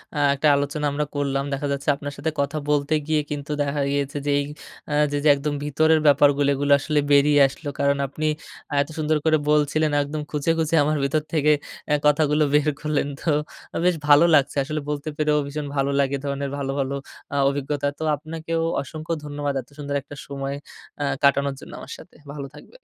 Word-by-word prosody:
আ - - -1 0.2
একটা 150 +3 +1
আলোচনা 145 +1 -1
আমরা 150 +1 -1
করলাম। 140 -1 0
দেখা 145 +1 -2
যাচ্ছে 140 +1 -2
আপনার 145 0 -6
সাথে 160 +3 -2
কথা 140 +2 -2
বলতে 145 +1 +1
গিয়ে 155 -1 +2
কিন্তু 145 0 -4
দেখা 140 0 -1
গিয়েছে 140 +1 -1
যে, - - +2
এই - - 0 0.5
আ - - 0 0.2
যে 145 - 0
যে, - - +6
একদম 145 +1 -3
ভিতরের 155 +2 +3
ব্যাপারগুলি 145 0 +5
এগুলা 145 +1 +2
আসলে 150 0 0
বেরিয়ে 145 0 +5
আসলো। 140 +3 -10
কারণ 140 0 +2
আপনি 155 +3 -4 0.6
এত 145 - -3
সুন্দর 155 0 +1
করে 155 -1 +4
বলছিলেন 150 +1 +2
একদম 150 +1 -4
খুঁজে, 150 +2 0
খুঁজে, 160 +1 +1
আমার 155 +1 +1
ভিতর 150 +3 +1
থেকে 150 -1 +3 0.4
এ্যা 150 - +3
কথাগুলো 150 0 +3
বের 150 0 +3
করলেন 150 -2 0
তো 165 - -2 0.6
বেশ 180 -2 +4
ভালো 145 +3 +7
লাগছে 140 0 +2
আসলে 155 +2 -3
বলতে 150 +1 -3
পেরেও 150 -1 +2
ভীষণ 145 +1 -4
ভালো 140 +1 +1
লাগে। 140 0 +1
এ - - -13
ধরণের 140 0 -2
ভালো, 135 -1 -2
ভালো 135 0 -1 0.4
আ - - +1
অভিজ্ঞতা। 145 +1 -2
তো - - -3
আপনাকেও 165 +2 -4 0.2
অসংখ্য 155 +3 -5
ধন্যবাদ 145 -1 -3
এত 125 - -22
সুন্দর 145 -1 -4
একটা 145 +1 -11
সময় 140 0 -4 0.5
আ - - +1 0.2
কাটানোর 140 0 +3
জন্য - - -12
আমার - - -10
সাথে। - - -15 0.2
ভালো 140 -2 -6
থাকবেন। - - -15
145 Hz, 195 wpm, -23 LUFS, 140-150 Hz, 0.6 s, ভালো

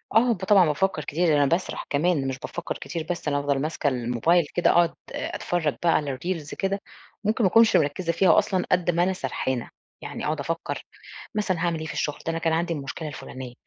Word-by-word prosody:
آه، 240 +2 +5
ده 190 -3 -2
طبعًا، 195 -3 +6
بافكَّر 155 +1 0
كتير، 170 +5 0
ده 155 - +4
أنا 145 -1 +4
باسرح 170 +6 -1
كمان 145 -2 +1
مش 130 0 -3
بافكَّر 175 - -5
كتير 165 -2 -5
بس. 175 -3 -3
أنا 145 -1 +1
بافضل 140 -1 0
ماسكة 155 -1 -1
الموبايل 125 +7 +2
كده، 175 - +3
أقعد 170 -1 +4 0.2
أ - - -4
أتفرَّج 175 -3 -1 0.2
بقى 170 - +4
على 140 -3 -1
الReels 170 -3 -4
كده، 195 +1 -1 0.4
ممكن 220 +3 +1
ما 190 - +5
أكونش 225 +1 +5
مركِّزة 165 +4 0
فيها 170 0 +4
أصلًا، 185 -2 0
قدّ 180 -1 +3
ما 175 +1 +2
أنا 190 +1 +1
سرحانة، 130 -4 -3 0.3
يعني - - -6
أقعد 155 0 -1
أفكَّر 165 +4 -3 0.5
مثلًا 195 -4 0
هاعمل 170 -2 0
إيه 160 - -5
في 155 - -5
الشغل، 150 0 -2
ده 165 - 0
أنا 165 - -2
كان 165 -1 +1
عندي 170 +1 0
المشكلة 150 +2 -5
الفلانية، 130 -3 -8
165 Hz, 215 wpm, -25 LUFS, 145-180 Hz, 0.5 s, طبعًا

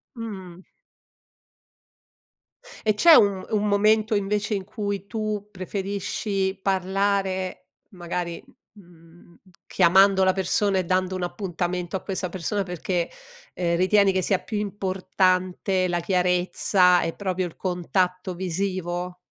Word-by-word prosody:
Mhmm. 190 -6 -8 2.2
E 215 - +3
c'è 330 +9 +7
un 200 -5 +4
un 210 -1 +1
momento 215 +1 +3
invece 205 +1 0
in 195 -2 -3
cui 200 -2 -4
tu 210 -1 -3
preferisci 195 0 -3
parlare 190 -1 -1 0.2
magari, 175 -2 -5 0.3
m 205 - -15
mhmm, 170 0 -20 0.3
chiamando 190 +2 +4
la 185 - +4
persona 190 +1 +1
e 185 - 0
dando 185 +1 0
un 185 - -4
appuntamento 175 -1 -3
a - - -6
questa 190 -2 -3
persona 190 +3 -2
perché, 180 -1 -2 0.5
ehm, 170 -1 0
ritieni 195 +2 +4
che 185 - 0
sia 190 +2 +1
più 215 -3 -4
importante 185 -1 0
la 175 -1 0
chiarezza 180 0 +2
e 165 - -2
proprio 185 -2 -2
il 165 - -10
contatto 180 0 -1
visivo? 180 -1 -3
190 Hz, 120 wpm, -24 LUFS, 180-200 Hz, 2.2 s, c'è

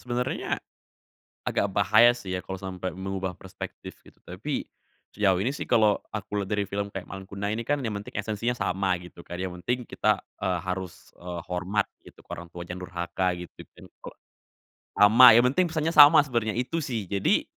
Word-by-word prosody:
sebenarnya 125 0 -2 0.9
agak - - 0
bahaya, 110 +4 +6
sih, 95 -6 -5
ya, 90 - -6
kalau 95 -1 -6
sampai 95 -1 -5
mengubah 95 0 -4
perspektif, 95 +2 -9
gitu. - - -20
Tapi - - -5 0.5
sejauh 95 -3 +3
ini, 105 - +1
sih, 140 - -4
kalau 110 -4 +3
aku 105 -1 -3
lihat 95 - -7
dari 100 -2 0
film 100 0 -3
kayak 95 -2 -7
Malin 95 0 -8
Kundang 100 +2 -3
ini, 115 - -4
kan, 145 +4 0
yang 110 -5 -3
penting 100 - -8
esensinya 110 +3 -2
sama, 95 -6 -1
gitu, 90 -1 -13
kan. 90 +1 -7
Yang 90 -1 -5
penting 125 +1 +1
kita, 105 -2 +1 0.2
eee, 95 -3 -1
harus, 95 -1 -6
eee, 90 -1 -6
hormat, 95 +3 -1 0.2
gitu, - - -16
ke - - -23
orang 85 0 -11
tua, 85 0 -8
jangan 90 +1 -6
durhaka, 85 +1 -2
gitu, 90 0 -9
kan, - - -15 0.2
kalau - - -9 0.8
sama, 110 +5 +8
yang 120 - +6
penting 185 +6 +3
pesannya 160 0 -1
sama 150 0 +9
sebenernya, 115 -6 -1
itu, 125 +7 -1
sih. 120 -8 -3
Jadi 100 +1 +1
100 Hz, 190 wpm, -26 LUFS, 90-115 Hz, 0.9 s, sama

